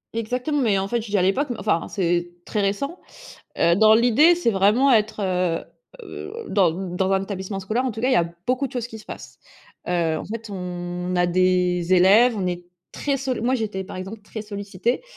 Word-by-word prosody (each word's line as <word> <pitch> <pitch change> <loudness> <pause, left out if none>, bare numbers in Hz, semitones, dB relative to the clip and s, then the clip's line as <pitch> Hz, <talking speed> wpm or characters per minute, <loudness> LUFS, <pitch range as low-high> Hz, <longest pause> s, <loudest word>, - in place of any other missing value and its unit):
Exactement, 250 +6 -1
mais 215 -6 +2
en 190 0 -1
fait, 235 +3 -1
je 220 - -9
dis 205 - +1
à 185 - +2
l'époque, 225 +11 +1
enfin, 205 -6 0
c'est 175 -2 -1 0.2
très 210 - -1
récent, 240 - -2 0.6
heu, 170 - +4
dans 215 +2 +6
l'idée, 245 +9 +5
c'est 345 -8 +1
vraiment 215 +7 +3
être, 215 -2 +2
heu 180 -3 0 0.4
heu, 395 - -8 0.2
dans 190 -4 +3
dans 185 +2 -2
un 190 0 +2
établissement 195 0 -5
scolaire, 220 +7 -1
en 255 - -1
tout 220 0 -7
cas, 250 - +1
il - - +2
y - - +4
a 170 -6 +2 0.2
beaucoup 255 +2 +1
de 260 - -7
choses 245 -3 -3
qui 225 - -9
se 215 - -14
passent, - - -10 0.5
heu, 170 -3 0
en - - -6
fait, 225 +1 -7
on 180 -1 -4
a 175 0 +2
des 180 0 +2
élèves, 205 +7 +5
on 190 -3 -1
est 175 0 -4 0.3
très 280 -1 -1
solli 260 -3 -3
moi, 245 +3 +1
j'étais, 215 -6 -2
par 190 0 -9
exemple, 190 +4 -7
très 220 +1 -7
sollicitée, 205 - -3
200 Hz, 215 wpm, -23 LUFS, 180-235 Hz, 0.6 s, dans